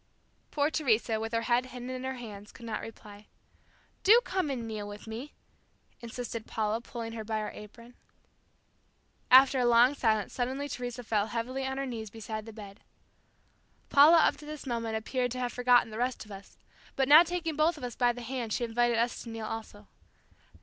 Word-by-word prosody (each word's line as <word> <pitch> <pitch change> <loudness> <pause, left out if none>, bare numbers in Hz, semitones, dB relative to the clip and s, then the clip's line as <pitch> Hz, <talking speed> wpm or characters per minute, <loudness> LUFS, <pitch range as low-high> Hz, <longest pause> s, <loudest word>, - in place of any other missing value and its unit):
'" - - -41
Poor 295 +1 0
Teresa, 230 -7 +1
with 225 0 -4
her 230 0 0
head 245 +2 +1
hidden 250 0 -7
in 255 0 -5
her 265 0 -3
hands, 210 -4 -9
could 235 - -12
not 220 -2 -3
reply. 210 -2 -11 0.8
"Do 440 +4 +8
come 375 -9 -1
and 245 -4 -3
kneel 215 -2 -5
with 205 0 -9
me," 230 +6 -7 0.6
insisted 235 -1 -6
Paula, 220 +1 -1
pulling 230 -1 -6
her 225 -1 -5
by 220 0 -2
her 215 -1 -3
apron. 230 +3 -12 1.4
After 265 +1 +7
a 250 - +2
long 240 +3 +5
silence 220 -6 0
suddenly 260 +3 -2
Teresa 245 -2 -5
fell 215 -2 0
heavily 250 +4 -3
on 265 0 -3
her 275 - -2
knees 225 -4 -5
beside 215 0 -7
the - - -7
bed. 205 -2 -11 1.1
Paula 300 +4 +7
up 320 - +4
to 300 - -12
this 305 -1 -7
moment 230 -3 -2
appeared 245 +3 -1
to 255 - -5
have 245 -1 -2
forgotten 245 -2 +4
the 215 - -6
rest 250 -2 -2
of 210 - -15
us, 195 0 -11 0.4
but 270 -1 +1
now 300 +3 +10
taking 345 -2 -2
both 310 +2 +2
of 280 - -10
us 245 -2 -5
by 245 -1 +3
the 245 0 -8
hand 235 -3 -4
she - - -1
invited 240 0 +1
us 235 +1 0
to 235 - -9
kneel 225 -1 -5
also. 215 -2 -7
240 Hz, 200 wpm, -30 LUFS, 220-260 Hz, 1.4 s, now